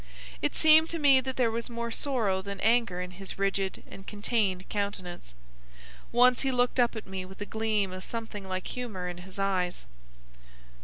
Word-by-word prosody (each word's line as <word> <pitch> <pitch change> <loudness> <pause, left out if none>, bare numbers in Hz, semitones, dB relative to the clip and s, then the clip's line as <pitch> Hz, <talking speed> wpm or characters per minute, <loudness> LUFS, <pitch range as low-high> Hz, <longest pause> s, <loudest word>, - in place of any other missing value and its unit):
It - - 0
seemed 315 +1 +6
to 335 - -2
me 280 -4 +6
that 260 0 -4
there 240 -3 +2
was 230 +1 -3
more 235 0 -4
sorrow 225 -8 0
than 200 0 -6
anger 225 -5 +2
in 180 0 -5
his 195 +1 -8
rigid 195 -1 -1
and 195 - -12
contained 205 -3 0
countenance. 185 - -4 0.8
Once 250 +1 +5
he 270 - +1
looked 250 0 +1
up 240 -1 +3
at 220 - -6
me 190 -1 -5
with 190 +1 -12
a 205 - -3
gleam 215 -3 0
of 185 0 -7
something 225 -4 -5
like 185 -1 -3
humour 215 -8 -4
in 175 0 -5
his 185 +2 -11
eyes. 185 - -1
205 Hz, 185 wpm, -29 LUFS, 190-240 Hz, 0.8 s, seemed